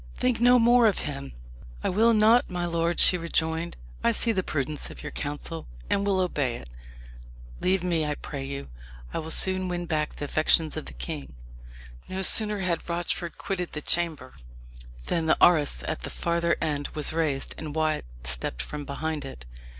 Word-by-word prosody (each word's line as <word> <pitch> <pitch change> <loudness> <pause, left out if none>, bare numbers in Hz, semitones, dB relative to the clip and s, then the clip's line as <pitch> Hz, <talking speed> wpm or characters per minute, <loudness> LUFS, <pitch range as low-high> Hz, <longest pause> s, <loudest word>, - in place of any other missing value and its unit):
think 250 -3 0
no 245 +1 +6
more 240 0 +5
of 205 - +1
him." 140 -2 -6 0.5
"I - - 0
will 225 +5 +3
not, 225 +2 +4
my 175 -1 -3
lord," 170 0 -1
she 180 - +6
rejoined; 165 0 -2 0.3
"I - - +4
see 230 - +6
the 190 -4 0
prudence 150 -3 -3
of - - -11
your - - -6
counsel, 145 +3 -6 0.2
and 200 - +1
will 195 -2 +1
obey 145 -9 -1
it. 70 - -10 0.9
Leave 185 0 +1
me, 170 -3 0
I 150 -1 -2
pray 140 -1 -7
you. 140 +1 -6 0.4
I - - -2
will 160 0 -6
soon 185 +2 +5
win 175 -1 -3
back 155 -2 -2
the 145 - -5
affections 155 +1 +1
of 155 - -6
the - - -5
king." 150 - -7 0.7
No 190 +1 -3
sooner 210 +1 +7
had 175 -2 -2
Rochford 170 0 -3
quitted 180 -3 -4
the 150 - -4
chamber 160 -6 -2 0.7
than 165 -1 -1
the - - +3
arras 150 - +3
at - - -4
the - - -4
farther 170 0 0
end 145 -3 -2
was 150 0 +1
raised, 155 -4 -1
and 155 -1 -6
Wyat 155 - 0 0.2
stepped - - 0
from 145 - -7
behind 150 +2 -4
it. 130 - -10
165 Hz, 180 wpm, -26 LUFS, 150-180 Hz, 0.9 s, sooner